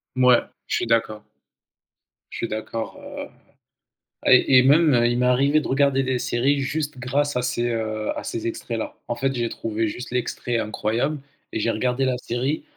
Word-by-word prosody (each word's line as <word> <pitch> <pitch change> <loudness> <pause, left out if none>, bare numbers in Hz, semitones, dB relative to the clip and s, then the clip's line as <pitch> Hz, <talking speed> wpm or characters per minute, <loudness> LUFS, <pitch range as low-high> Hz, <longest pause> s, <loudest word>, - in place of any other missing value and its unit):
Mouais, 125 -1 +5 0.3
je - - 0
suis - - -2
d'accord. 115 -2 0 1.1
Je - - -6
suis 115 - -2
d'accord, 110 +1 -5
heu - - -7 1.0
et 130 +1 +6
et - - +5
même, 150 +2 +5
heu, 120 0 +4
il 120 0 0
m'est 125 - +2
arrivé 140 +4 +3
de - - -5
regarder 135 0 +2
des 130 -1 0
séries 125 +3 +1
juste 145 +1 -2
grâce 140 +3 -1
à - - +1
ces, 120 -1 -1
heu, 110 -2 -2
à - - -5
ces 115 - -4
extraits-là. 115 0 -4
En 120 - -2
fait, 135 +2 0
j'ai 120 -2 -1
trouvé 110 0 -2
juste 120 +4 -6
l'extrait 120 -1 -2
incroyable 115 +6 -1 0.3
et 110 - -1
j'ai 115 - 0
regardé 125 +4 0
la 125 -1 0
série 130 - -2
125 Hz, 185 wpm, -23 LUFS, 115-135 Hz, 1.1 s, et